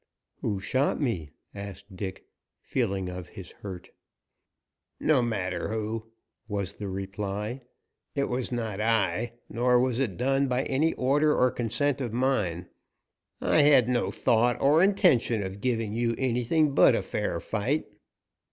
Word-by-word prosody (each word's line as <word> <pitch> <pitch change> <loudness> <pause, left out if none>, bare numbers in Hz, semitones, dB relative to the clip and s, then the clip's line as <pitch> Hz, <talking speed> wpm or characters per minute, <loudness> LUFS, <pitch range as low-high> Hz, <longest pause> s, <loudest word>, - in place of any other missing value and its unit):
"Who 100 -3 -1
shot 130 +8 0
me?" 105 - -1 0.2
asked 100 0 -9
Dick, 95 0 -6 0.4
feeling 100 -7 -1
of 90 -1 -7
his 95 -2 -10
hurt. 95 -2 -9 1.1
"No 150 -5 +3
matter 100 -6 -2
who," 110 +1 -3 0.4
was 100 -4 -2
the 105 - -6
reply. 100 +5 -4 0.5
"It 140 - +1
was 125 -2 -2
not 110 -4 -3
I, 110 0 +1
nor 125 +1 +2
was 125 -1 +1
it 110 -10 -1
done 135 +2 +2
by 125 +1 0
any 150 +5 +1
order 145 +4 +2
or 125 0 +3
consent 125 +4 0
of 120 -4 -3
mine. 105 -9 0 0.8
I 155 - +4
had 140 -5 +6
no 125 -1 +1
thought 120 +1 +2
or 150 +4 +4
intention 175 - +3
of 95 +1 -6
giving 115 -4 -1
you 115 0 0
anything 130 +4 +1
but - - +6
a - - -1
fair - - -2
fight." 120 +8 -1
115 Hz, 145 wpm, -27 LUFS, 100-130 Hz, 1.1 s, had